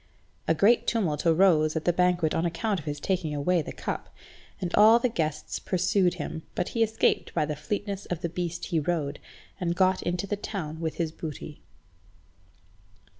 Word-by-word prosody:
A 165 Hz, -, +3 dB
great 220 Hz, +8 st, +4 dB
tumult 175 Hz, -9 st, 0 dB
arose 160 Hz, -2 st, +4 dB
at 160 Hz, -, -2 dB
the 175 Hz, -, +3 dB
banquet 180 Hz, -3 st, +2 dB
on 165 Hz, -, 0 dB
account 180 Hz, +4 st, -1 dB
of 155 Hz, -, -12 dB
his 145 Hz, 0 st, -3 dB
taking 165 Hz, -2 st, -1 dB
away 170 Hz, +4 st, +2 dB
the -, -, -7 dB
cup, -, -, -5 dB, 0.5 s
and 175 Hz, -2 st, -3 dB
all 220 Hz, +2 st, +7 dB
the 240 Hz, -, +1 dB
guests 155 Hz, -8 st, -2 dB
pursued 185 Hz, 0 st, +1 dB
him, 160 Hz, -1 st, -5 dB
but 180 Hz, -, -1 dB
he 230 Hz, -, -2 dB
escaped 220 Hz, 0 st, +2 dB
by 155 Hz, -3 st, +2 dB
the 150 Hz, 0 st, -3 dB
fleetness 200 Hz, +4 st, -4 dB
of 175 Hz, -2 st, -3 dB
the 170 Hz, -, 0 dB
beast 175 Hz, 0 st, -4 dB
he 165 Hz, -4 st, 0 dB
rode, 150 Hz, -2 st, -2 dB, 0.4 s
and 175 Hz, -2 st, -1 dB
got 185 Hz, +1 st, +3 dB
into 175 Hz, +2 st, -2 dB
the 205 Hz, -, -2 dB
town 175 Hz, -7 st, -5 dB
with 160 Hz, -1 st, -3 dB
his 165 Hz, -2 st, -1 dB
booty. 155 Hz, -2 st, -7 dB
175 Hz, 180 wpm, -27 LUFS, 155-190 Hz, 0.5 s, all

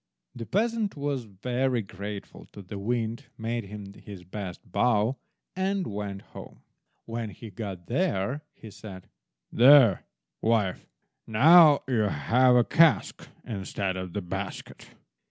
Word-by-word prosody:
'" -, -, -51 dB
The 115 Hz, -2 st, -7 dB
peasant 220 Hz, -2 st, 0 dB
was 140 Hz, -4 st, -2 dB
very 120 Hz, +4 st, -1 dB
grateful 100 Hz, +1 st, -8 dB
to 100 Hz, -, -10 dB
the 100 Hz, +2 st, -8 dB
Wind, 115 Hz, +4 st, -2 dB
made 115 Hz, 0 st, -3 dB
him 100 Hz, 0 st, -9 dB
his 100 Hz, -3 st, -11 dB
best 95 Hz, 0 st, -8 dB
bow, 120 Hz, +3 st, +2 dB, 0.4 s
and 190 Hz, 0 st, -1 dB
went 100 Hz, -1 st, -5 dB
home. -, -, -13 dB, 0.4 s
When 115 Hz, -1 st, -4 dB
he 105 Hz, +3 st, -11 dB
got 95 Hz, -3 st, -7 dB
there, 130 Hz, -, -1 dB
he 110 Hz, -, -12 dB
said— 100 Hz, -3 st, -11 dB, 0.4 s
"There, 125 Hz, -5 st, +6 dB, 0.4 s
wife, 110 Hz, -5 st, 0 dB, 0.4 s
now 150 Hz, +6 st, +7 dB
you 125 Hz, -4 st, +1 dB
have 125 Hz, -, +3 dB
a 120 Hz, -, +5 dB
cask 165 Hz, +5 st, +2 dB, 0.2 s
instead 100 Hz, -3 st, -3 dB
of 95 Hz, -2 st, -6 dB
the 100 Hz, -, -3 dB
basket." 90 Hz, -, -7 dB
110 Hz, 135 wpm, -27 LUFS, 100-130 Hz, 0.4 s, now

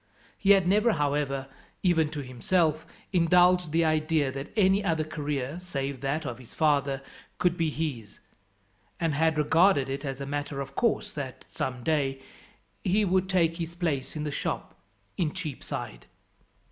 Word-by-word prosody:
He 200 Hz, 0 st, +5 dB
had 190 Hz, -3 st, +3 dB
never, 210 Hz, +4 st, +4 dB
however, 140 Hz, -3 st, 0 dB, 0.4 s
even 165 Hz, -4 st, +3 dB
to 150 Hz, -2 st, -5 dB
himself, 155 Hz, +6 st, 0 dB, 0.3 s
indulged 180 Hz, -1 st, +4 dB
the 165 Hz, +1 st, +3 dB
idea 155 Hz, -2 st, +2 dB
that 135 Hz, +2 st, -6 dB
any 195 Hz, 0 st, +4 dB
other 165 Hz, -4 st, +1 dB
career, 150 Hz, -1 st, -3 dB
save 140 Hz, -7 st, -4 dB
that 140 Hz, +3 st, -1 dB
of 120 Hz, 0 st, -5 dB
his 125 Hz, -, -14 dB
father, 140 Hz, -3 st, +2 dB, 0.3 s
could 175 Hz, -1 st, +2 dB
be 165 Hz, -2 st, +1 dB
his; 140 Hz, -10 st, -4 dB, 0.8 s
and 165 Hz, -3 st, +1 dB
had 160 Hz, +2 st, +2 dB
regarded 150 Hz, -1 st, +4 dB
it 135 Hz, +2 st, -3 dB
as 135 Hz, -2 st, -4 dB
a 140 Hz, -, -4 dB
matter 145 Hz, 0 st, -3 dB
of 135 Hz, 0 st, -5 dB
course 210 Hz, +2 st, 0 dB
that, 130 Hz, -3 st, -6 dB
some 125 Hz, -2 st, -3 dB
day, 140 Hz, -3 st, 0 dB, 0.6 s
he 205 Hz, +3 st, +2 dB
would 185 Hz, 0 st, +1 dB
take 170 Hz, -3 st, +2 dB
his 170 Hz, -1 st, -5 dB
place 160 Hz, -7 st, -2 dB
in 150 Hz, -, -3 dB
the 150 Hz, -, -2 dB
shop -, -, -3 dB, 0.4 s
in 160 Hz, -4 st, 0 dB
Cheapside. 145 Hz, -, -6 dB
155 Hz, 160 wpm, -28 LUFS, 140-175 Hz, 0.8 s, He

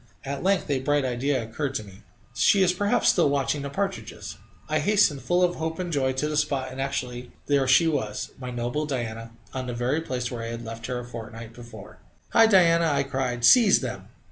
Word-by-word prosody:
At 140 Hz, 0 st, -4 dB
length 190 Hz, 0 st, +1 dB
a 135 Hz, -, +1 dB
bright 145 Hz, +1 st, +1 dB
idea 130 Hz, +1 st, -1 dB
occurred 135 Hz, +5 st, -4 dB
to 110 Hz, -, -2 dB
me: 100 Hz, 0 st, -15 dB, 0.3 s
"She 195 Hz, +9 st, +4 dB
is 180 Hz, -1 st, +3 dB
perhaps 205 Hz, +6 st, +2 dB
still 170 Hz, -5 st, +3 dB
watching 140 Hz, +1 st, 0 dB
the 140 Hz, -, -5 dB
partridges." 195 Hz, +6 st, -5 dB, 0.3 s
I -, -, 0 dB
hastened, 200 Hz, -9 st, +2 dB
full 175 Hz, +7 st, +1 dB
of 175 Hz, 0 st, +1 dB
hope 160 Hz, 0 st, -3 dB
and 180 Hz, -2 st, -4 dB
joy, 135 Hz, -2 st, +1 dB
to 130 Hz, +3 st, -1 dB
the 150 Hz, -, -3 dB
spot, 140 Hz, -3 st, -1 dB
and 135 Hz, -, -5 dB
actually 125 Hz, -2 st, -4 dB
there 140 Hz, -2 st, +2 dB
she 150 Hz, +6 st, +5 dB
was! 110 Hz, -9 st, -2 dB
my 125 Hz, -1 st, -6 dB
noble 120 Hz, +5 st, -3 dB
Diana 115 Hz, -4 st, -4 dB, 0.2 s
on 130 Hz, -1 st, -4 dB
the 120 Hz, -, -4 dB
very 125 Hz, +6 st, 0 dB
place 125 Hz, -5 st, -4 dB
where 120 Hz, -2 st, -5 dB
I 115 Hz, -, -5 dB
had 115 Hz, 0 st, -6 dB
left 115 Hz, 0 st, -7 dB
her 125 Hz, -1 st, -3 dB
a 120 Hz, -, -6 dB
fortnight 115 Hz, -1 st, -9 dB
before. 115 Hz, -4 st, -12 dB, 0.3 s
"Hi, 225 Hz, 0 st, +6 dB
Diana!" 170 Hz, -5 st, +5 dB
I 145 Hz, -, +1 dB
cried. 130 Hz, -3 st, -2 dB
"Seize 230 Hz, -, +6 dB
them!" -, -, -6 dB
135 Hz, 215 wpm, -25 LUFS, 120-160 Hz, 0.3 s, Hi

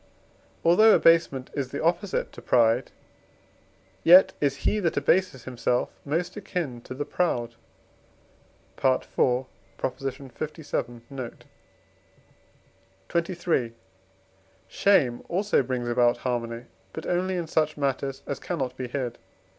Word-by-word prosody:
Although 215 Hz, +6 st, +7 dB
abasement 165 Hz, -6 st, +3 dB
is 135 Hz, -3 st, -3 dB
the 140 Hz, -, -4 dB
opposite 180 Hz, +4 st, 0 dB
to -, -, -11 dB
pride, 120 Hz, +1 st, +3 dB, 1.1 s
yet 185 Hz, +2 st, +8 dB
is 140 Hz, -1 st, -1 dB
he 215 Hz, -, +2 dB
that 170 Hz, -7 st, 0 dB
abases 145 Hz, -2 st, +1 dB
himself 125 Hz, 0 st, -1 dB
most 170 Hz, +5 st, -2 dB
akin 175 Hz, -, -4 dB
to 130 Hz, -, -7 dB
the 145 Hz, +2 st, -3 dB
proud 120 Hz, -10 st, -1 dB, 1.3 s
(IV. 130 Hz, -1 st, +3 dB, 0.7 s
lvii. 135 Hz, -1 st, -4 dB
note). 130 Hz, -4 st, -7 dB, 1.7 s
XXIII. 170 Hz, -8 st, 0 dB, 0.9 s
Shame 135 Hz, -12 st, +2 dB
also 200 Hz, +1 st, +2 dB
brings 125 Hz, -2 st, -3 dB
about 120 Hz, 0 st, +3 dB
harmony, 120 Hz, -1 st, -3 dB, 0.3 s
but -, -, -6 dB
only 185 Hz, +1 st, 0 dB
in 175 Hz, -, -2 dB
such 155 Hz, -1 st, 0 dB
matters 135 Hz, -1 st, -2 dB
as 140 Hz, -, -4 dB
cannot 135 Hz, -8 st, -3 dB
be 130 Hz, -, -5 dB
hid. 125 Hz, -2 st, -4 dB
140 Hz, 110 wpm, -26 LUFS, 125-170 Hz, 1.7 s, yet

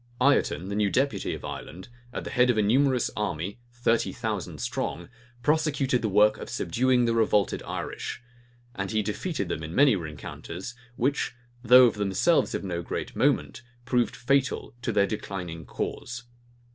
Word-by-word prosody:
Ireton, 130 Hz, -8 st, +2 dB
the 100 Hz, -, -3 dB
new 105 Hz, -1 st, +2 dB
deputy 135 Hz, +6 st, 0 dB
of -, -, -9 dB
Ireland, 95 Hz, +3 st, -7 dB, 0.2 s
at -, -, -5 dB
the -, -, -6 dB
head 125 Hz, -1 st, +4 dB
of 120 Hz, -, +3 dB
a 105 Hz, -, +3 dB
numerous 130 Hz, +3 st, +3 dB
army, 100 Hz, +1 st, -3 dB
thirty 120 Hz, -1 st, +1 dB
thousand 110 Hz, -6 st, -4 dB
strong, 85 Hz, -, -3 dB, 0.3 s
prosecuted 145 Hz, -4 st, +2 dB
the 110 Hz, -, 0 dB
work 105 Hz, +2 st, +4 dB
of -, -, -7 dB
subduing 125 Hz, +1 st, +2 dB
the 115 Hz, -, +2 dB
revolted 105 Hz, -3 st, +2 dB
Irish; -, -, -4 dB, 0.5 s
and 95 Hz, -3 st, -3 dB
he 110 Hz, -1 st, +1 dB
defeated 140 Hz, -, -2 dB
them -, -, -3 dB
in 80 Hz, +2 st, -6 dB
many 140 Hz, -5 st, +6 dB
rencounters, 85 Hz, +5 st, -7 dB, 0.2 s
which, 130 Hz, 0 st, 0 dB, 0.3 s
though 125 Hz, +1 st, +8 dB
of 120 Hz, -, +3 dB
themselves 105 Hz, -, +2 dB
of -, -, -3 dB
no 85 Hz, -3 st, -3 dB
great -, -, -5 dB
moment, -, -, +1 dB, 0.2 s
proved 120 Hz, -2 st, +1 dB
fatal 135 Hz, +2 st, 0 dB
to 120 Hz, -, -1 dB
their 100 Hz, -2 st, +3 dB
declining 90 Hz, -5 st, -5 dB
cause. 120 Hz, 0 st, -4 dB
115 Hz, 160 wpm, -27 LUFS, 100-125 Hz, 0.5 s, though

